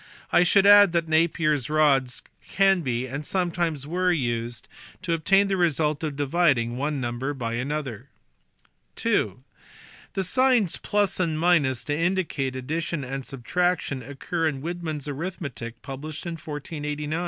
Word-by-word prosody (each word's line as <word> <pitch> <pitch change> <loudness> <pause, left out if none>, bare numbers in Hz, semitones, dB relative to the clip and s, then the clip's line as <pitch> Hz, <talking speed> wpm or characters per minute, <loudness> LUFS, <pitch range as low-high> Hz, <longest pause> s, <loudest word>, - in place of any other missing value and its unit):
I - - +5
should 195 +2 +4
add 205 -3 +8
that 170 -1 +1
Napier 160 -1 +2
s 140 -3 -3
rods 140 -5 +2 0.3
can 195 -2 +3
be, 125 -4 -2
and 140 +3 -5
sometimes 170 -4 -1
were, 180 +4 +1
used 120 -6 -2 0.4
to 175 -2 0
obtain 195 +5 +3
the 195 -1 0
result 155 -3 +1
of 150 -3 -2
dividing 140 -5 +1
one 145 +2 -2
number 130 +3 -3
by 115 -3 -3
another. 130 -2 -4 1.0
(ii) - - +2 0.8
The 195 - 0
signs 245 -1 +2
+ 205 -2 0
and 160 -4 0
to 145 -5 +2
indicate 165 -6 -1
addition 155 +4 -3
and 135 +1 -5
sub 130 -3 -11
traction 180 -6 0
occur 145 +6 -3
in 140 -3 -3
Widman 170 -2 -3
s 145 - -7
arithmetic 140 -7 -5
published 145 +4 -7
in 170 - -3
1489 155 -1 -7
(see 150 +1 -4
below, - - -5
p. 155 - -1
155 Hz, 155 wpm, -25 LUFS, 135-175 Hz, 1.0 s, add